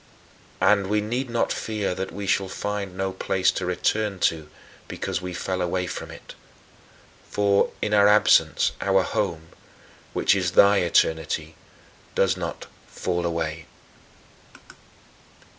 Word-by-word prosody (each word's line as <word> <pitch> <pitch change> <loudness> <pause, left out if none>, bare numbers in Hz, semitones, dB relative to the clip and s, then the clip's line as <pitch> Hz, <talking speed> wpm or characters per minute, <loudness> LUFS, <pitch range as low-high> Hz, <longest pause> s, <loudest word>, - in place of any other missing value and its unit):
And 100 -2 +3
we 105 +2 +1
need 120 +5 -3
not 115 0 0
fear 105 -4 -2
that 95 +1 -5
we 100 0 -6
shall 95 0 +1
find 100 -1 -4
no 95 0 -1
place 95 0 +1
to 90 - -4
return 105 +3 0
to 80 -2 0 0.4
because - - -4
we 90 0 -5
fell 95 +1 -3
away 90 +1 -1
from - - -6
it. - - -11 1.0
For, 100 -1 +2
in 105 - -1
our 100 -1 +6
absence, 105 +1 +4
our 95 -1 +3
home 80 -6 -3 0.6
which - - +3
is 90 -2 0
thy 100 +2 +6
eternity 80 -2 +1 0.6
does - - +2
not - - -5 0.2
fall 85 -1 -2
away. 80 -1 -3
95 Hz, 130 wpm, -24 LUFS, 90-105 Hz, 1.0 s, our